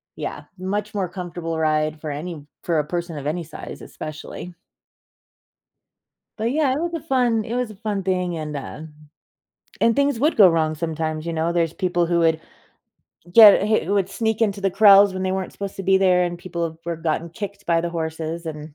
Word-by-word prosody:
Yeah, - - -5
much 205 +3 -3
more 195 -3 -1
comfortable 175 -2 -5
ride 155 -1 0
for 155 -2 -4
any 150 0 -6 0.2
for 165 -3 +1
a 150 - -1
person 170 -2 -4
of 140 - -7
any 170 +3 -2
size, 155 0 -9
especially. 155 +3 -8 1.9
But, 225 +2 0
yeah, 280 -2 +2
it 280 - -2
was 345 0 -2
a 330 - -2
fun 250 -7 +1
it 230 - -4
was 250 -3 -1
a - - -12
fun 205 -1 -3
thing, 180 -2 -1
and, 150 -1 -5
uh 140 +2 -7 1.0
and 230 - +4
things 280 -3 +2
would 305 +4 +2
go 200 -4 +8
wrong 160 -1 +1
sometimes, 155 -1 -3
you 170 - -2
know, 165 +1 0
there's 170 -2 +1
people 175 -2 0
who 170 0 +1
would 160 -1 +2 0.9
get 205 -1 +8
who 215 -2 +1
would 195 -2 +1
sneak 220 0 -1
into 200 -2 0
the 195 - +1
crawls 200 0 +7
when 185 - -3
they 185 - 0
weren't 190 -1 -3
supposed 200 -1 -6
to 195 - -5
be 190 0 +4
there, 180 -2 +4
and 175 0 -4
people 175 -1 -4
have 160 -1 -5
were 170 -1 -3
gotten 165 +1 -2
kicked 200 +1 -7
by 170 -1 +3
the 170 0 -3
horses, 160 0 -4
and 150 -1 -7
175 Hz, 200 wpm, -22 LUFS, 160-205 Hz, 1.9 s, go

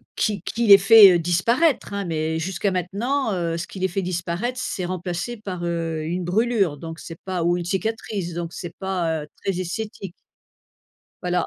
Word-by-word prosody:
qui 210 -4 0
qui 230 +5 -2
les 200 -1 +11
fait, 200 -1 +9
heu, - - +2
disparaître, 215 - +1
hein. 200 -1 -2
Mais 160 -1 -1
jusqu'à 190 +3 -1
maintenant, 210 - -1
heu, 170 -2 -1
ce 170 +1 -4
qui 195 - -9
les 190 - +1
fait 190 +2 -2
disparaître, 180 +7 -3
c'est 185 - -3
remplacé 185 +5 -4
par, 185 -4 -6
heu, 165 -2 -2
une 175 +3 -2
brûlure, 195 -3 +1
donc 160 +2 -8
c'est 165 -1 -9
pas 185 -3 -2
ou 175 +1 +2
une 175 - -4
cicatrice, 195 -1 -3
donc 170 0 -4
c'est 175 -1 -7
pas, 170 -5 -1
heu, - - -11 0.2
très 195 -2 -1
esthétique. 195 0 -5 1.1
Voilà. 180 -1 0
180 Hz, 185 wpm, -23 LUFS, 170-200 Hz, 1.1 s, les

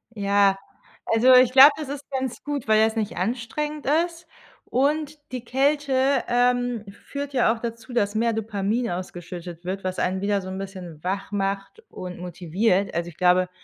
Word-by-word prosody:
Ja, 200 -1 +3 0.5
also 245 +3 +5
ich 250 -1 +6
glaube, 275 +3 +10
das 300 -3 -6
ist 285 -1 -7
ganz 260 -2 -3
gut, 290 -5 -4
weil 215 0 +5
das 220 +1 +1
nicht 215 -5 -3
anstrengend 255 +9 -3 0.2
ist. 340 0 -12 0.4
Und 295 +3 0
die 250 -2 -5
Kälte, 270 0 +1
ähm, 245 -2 +1
führt 280 +6 -7
ja 245 -3 +3
auch 225 - -8
dazu, 230 +1 -6
dass 205 -3 +1
mehr 230 +1 +1
Dopamin 220 +1 -1
ausgeschüttet 175 -1 -7
wird, 190 +1 -4
was 185 0 -3
ein 185 +1 0
wieder 200 -1 0
so 185 - -8
'n 190 - -5
bisschen 180 -5 -8
wach 195 +2 -3
macht 195 - -3
und 180 -1 -8
motiviert. 180 +3 0
Also, 170 +1 -2
ich 165 - -16
glaube, 180 0 +3
220 Hz, 170 wpm, -24 LUFS, 190-260 Hz, 0.5 s, glaube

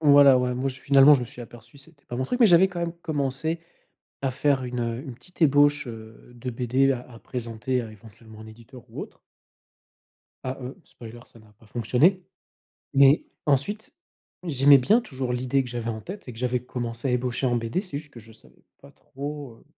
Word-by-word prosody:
voilà, 140 -3 +7
ouais, 125 0 -1
moi 130 +2 -1
je 130 0 -7
finalement 140 +1 +7
je 135 - +1
me 125 - -3
suis 120 +1 -12
aperçu, 120 +3 -13
c'était 140 0 -16
pas 120 - -6
mon 130 - -1
truc 245 - -3
mais 230 - +8
j'avais 185 +1 +6
quand 175 -2 -6
même 170 -1 -2
commencé 155 +1 -2 0.6
à 135 - 0
faire 140 0 +1
une, 125 0 -4
heu, 115 0 -2
une 130 -5 -8
petite 180 +6 -9
ébauche, 145 -1 +4
heu, 110 +1 -11
de 125 +1 -6
BD 130 +3 +1
à 125 - -4
à 115 - -12
présenter 120 +1 -4
éventuellement 110 -1 -10
à - - -9
un - - -12
éditeur 115 +3 -14
ou - - -7
autre - - -9 1.3
ah, 130 +1 -3
heu, 130 +1 -7
spoiler 115 0 -12
ça - - -19
n'a 110 -1 -20
pas 110 - -21
fonctionné. 125 - +2 0.7
Mais, 140 +2 +6 0.2
ensuite 205 - 0 0.5
j'aimais 140 -3 +6
bien 210 - +3
toujours 130 - -4
l'idée 130 +2 0
que - - -8
j'avais 120 -1 -4
en 110 - -5
tête 190 - -9
et - - -6
que 115 - -13
j'avais 125 0 0
commencée 120 0 -4
à - - +1
ébaucher 125 +1 -1
en 120 - +1
BD 115 +10 -2
c'est 185 -8 -6
juste 145 -1 -13
que 115 - -10
je 110 +1 -16
savais 65 - -22 0.2
pas - - -16
trop, 140 -3 -8
heu, - - -23
130 Hz, 210 wpm, -25 LUFS, 120-145 Hz, 1.3 s, mais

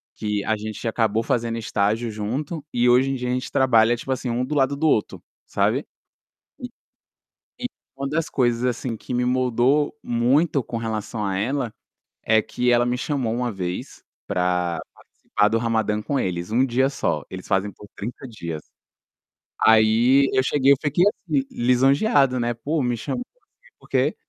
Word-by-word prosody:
que 105 -1 -2
a 110 - +1
gente 110 +2 -6
acabou 115 -1 +1
fazendo 115 0 -1
estágio 110 +1 0
junto 130 +9 -4
e 120 0 +2
hoje 125 +2 +4
em - - -1
dia 125 -1 -3
a - - 0
gente 125 0 -3
trabalha 120 -3 +4
tipo 130 +3 -2
assim, 130 -1 -4
um 120 +2 -1
do 150 +4 -3
lado 140 0 +2
do 160 +2 +1
outro, 110 -8 0 0.2
sabe. - - 0 0.7
E - - -5 0.9
e - - -5 0.3
uma 140 0 -3
das 155 +2 -1
coisas, 120 -2 +1
assim, 125 -1 -2
que 125 - -7
me 125 0 +1
moldou 130 +4 +2
muito 130 +5 +2
com 115 - -5
relação 110 -1 -3
a 95 -1 -1
ela, 125 +3 -1 0.5
é 110 -1 +4
que 125 +3 -1
ela 120 0 +4
me 120 0 0
chamou 130 -4 -1
uma 125 +1 -1
vez 90 -3 -5 0.2
para 90 -3 0
participar 105 - -1
do 115 - +1
Ramadan 110 -2 0
com 140 +5 -1
eles, 90 +1 -3
1 125 +4 +3
dia 130 +1 +2
só, 140 - -2
eles 95 0 -8
fazem 95 +1 0
por 105 - -14
30 120 +6 -7
dias. 85 -9 -6 1.1
Aí 115 +5 +5
eu 130 - +3
cheguei 135 +1 +3
eu - - +4
fiquei 150 +4 +2
assim, 160 -10 0
lisonjeado 135 - +3
né, 120 0 0
pô 145 +7 -2
me 120 -1 0
chamo, 245 - -4 0.6
por - - -20
quê - - +1
120 Hz, 175 wpm, -23 LUFS, 110-135 Hz, 1.1 s, Aí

